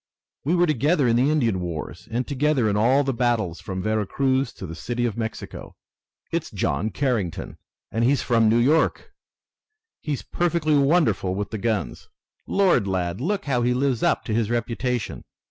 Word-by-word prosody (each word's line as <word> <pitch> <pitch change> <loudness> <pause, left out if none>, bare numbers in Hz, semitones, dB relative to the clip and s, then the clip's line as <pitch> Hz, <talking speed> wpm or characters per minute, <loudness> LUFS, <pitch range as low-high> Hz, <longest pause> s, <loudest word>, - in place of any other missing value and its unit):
We 160 +6 +1
were 175 0 +4
together 150 -1 +2
in 115 - +3
the 130 +4 +3
Indian 120 -11 +1
wars, 85 0 -6
and 120 +2 -1
together 140 -3 +1
in 100 - +1
all 125 +7 +4
the 135 -1 -1
battles 115 -8 0
from 95 -1 -5
Vera 110 -1 0
Cruz 135 +2 +1
to - - -8
the 80 - -7
City 120 +9 -2
of 115 -4 -1
Mexico. 110 -1 -6 0.6
It's - - -2
John 100 +11 -1
Carrington, 115 - -2 0.3
and 115 - 0
he's 135 +3 +2
from 115 -3 +3
New 115 - +4
York! 145 +7 +2 0.9
He's 145 -4 -3
perfectly 170 -3 0
wonderful 135 - +2
with 100 +1 -3
the 110 - -4
guns! 110 -1 -2 0.4
Lord, 185 - +3
lad, 90 +1 -2
look 200 +6 -1
how 130 -4 +1
he 125 +1 +2
lives 130 -2 0
up - - +1
to 110 - -2
his 110 -1 +1
reputation! 120 0 -2
120 Hz, 175 wpm, -24 LUFS, 105-140 Hz, 0.9 s, were